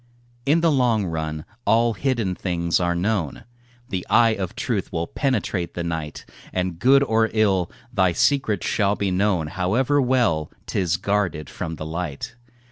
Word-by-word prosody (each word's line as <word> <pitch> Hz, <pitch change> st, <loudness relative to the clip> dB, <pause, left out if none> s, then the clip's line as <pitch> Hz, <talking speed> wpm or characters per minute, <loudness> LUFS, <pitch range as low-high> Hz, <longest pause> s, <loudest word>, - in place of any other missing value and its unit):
In 160 Hz, +4 st, +4 dB
the 165 Hz, -1 st, +4 dB
long 120 Hz, -7 st, +2 dB
run 80 Hz, -2 st, -3 dB, 0.2 s
all 115 Hz, 0 st, +3 dB
hidden 115 Hz, -5 st, 0 dB
things 85 Hz, -2 st, 0 dB
are 85 Hz, -1 st, +1 dB
known, 90 Hz, -4 st, -1 dB, 0.5 s
The 95 Hz, -5 st, -2 dB
eye 115 Hz, -1 st, +5 dB
of 95 Hz, -4 st, -4 dB
truth -, -, -2 dB
will 85 Hz, 0 st, -1 dB
penetrate 100 Hz, -8 st, -1 dB
the 85 Hz, -, -2 dB
night, 80 Hz, -3 st, -4 dB, 0.3 s
And 90 Hz, -2 st, -2 dB
good 135 Hz, +6 st, +5 dB
or 110 Hz, -3 st, +2 dB
ill, 95 Hz, -5 st, +2 dB, 0.2 s
thy 95 Hz, -5 st, +3 dB
secret 110 Hz, -, +1 dB
shall 100 Hz, 0 st, +1 dB
be 100 Hz, -2 st, -1 dB
known, 95 Hz, -3 st, +1 dB
However 115 Hz, -, +1 dB
well 120 Hz, -, +1 dB
'tis 90 Hz, -3 st, 0 dB
guarded 95 Hz, -6 st, -1 dB
from 80 Hz, -, -5 dB
the 80 Hz, -, -6 dB
light. 80 Hz, -3 st, -5 dB
95 Hz, 155 wpm, -23 LUFS, 85-115 Hz, 0.5 s, eye